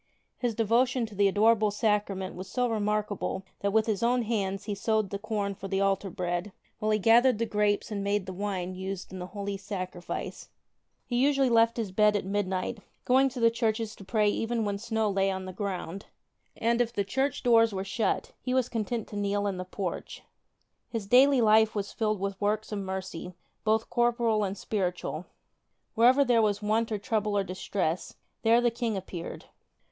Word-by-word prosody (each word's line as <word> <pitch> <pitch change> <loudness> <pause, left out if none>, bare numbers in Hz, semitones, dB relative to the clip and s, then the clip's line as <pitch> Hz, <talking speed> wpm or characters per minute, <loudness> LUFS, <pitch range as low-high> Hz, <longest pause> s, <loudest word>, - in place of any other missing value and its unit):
His 240 -3 -1
devotion 235 +3 +2
to 220 - -11
the 200 0 +3
Adorable 215 +2 +4
Sacrament 205 -3 0
was 185 +1 -8
so 250 +3 0
remarkable 210 -3 -1 0.2
that 200 - 0
with 220 +1 +3
his 215 -4 -1
own 240 +1 +2
hands 200 -3 -1
he 210 - -3
sowed 215 0 0
the 200 - -3
corn 205 -2 -2
for 195 0 -8
the 195 0 -1
altar 195 0 +1
bread, 175 +2 -3 0.3
while 215 -1 -1
he 215 - +3
gathered 230 +3 +5
the 230 - 0
grapes 210 -1 0
and 200 -1 -2
made 200 -1 0
the 190 - -6
wine 185 -2 -3
used 190 0 -6
in 185 - -6
the 180 - -5
Holy 200 0 -4
31 - - -20
Sacrifice/ 185 -3 -5 0.6
He 240 - -2
usually 275 -3 +3
left 230 0 +4
his 220 -5 -2
bed 210 +2 +4
at 200 - -1
midnight, 195 +2 -2 0.3
going 265 +2 +4
to 250 - -7
the 230 0 +5
churches 225 -2 -1
to - - -12
pray 210 +1 +1
even 225 +2 0
when 200 -1 -2
snow 220 0 0
lay 195 -1 +1
on 190 -1 -3
the 185 - -7
ground; 190 -1 -4 0.5
and 235 +1 +2
if 235 -1 0
the 205 -4 -1
church 265 +8 -1
doors 230 -2 +5
were 190 -1 -3
shut 215 +3 -1
he 255 0 -1
was 255 -2 +2
content 225 0 -2
to - - -8
kneel 205 0 0
in 195 -2 -1
the 185 - -4
porch. 185 -1 -5 0.7
His 225 -4 -4
daily 260 +4 +5
life 220 0 +5
was 205 -1 -3
filled 215 -3 0
with 195 0 -4
works 215 +2 0
of 210 - -2
mercy, 190 -2 -5 0.3
both 220 +1 +1
corporal 235 -3 +2
and 195 0 -2
spiritual. 180 -5 -3 0.7
Wherever 255 +5 +5
there 240 -2 +4
was 205 -2 +1
want 220 +2 0
or 215 - 0
trouble 210 -1 -1
or 200 - +2
distress, 185 -2 -3 0.3
there 230 +1 +5
the 240 -1 +2
King 230 -3 -2
appeared. 175 -2 -7
210 Hz, 195 wpm, -28 LUFS, 195-230 Hz, 0.7 s, gathered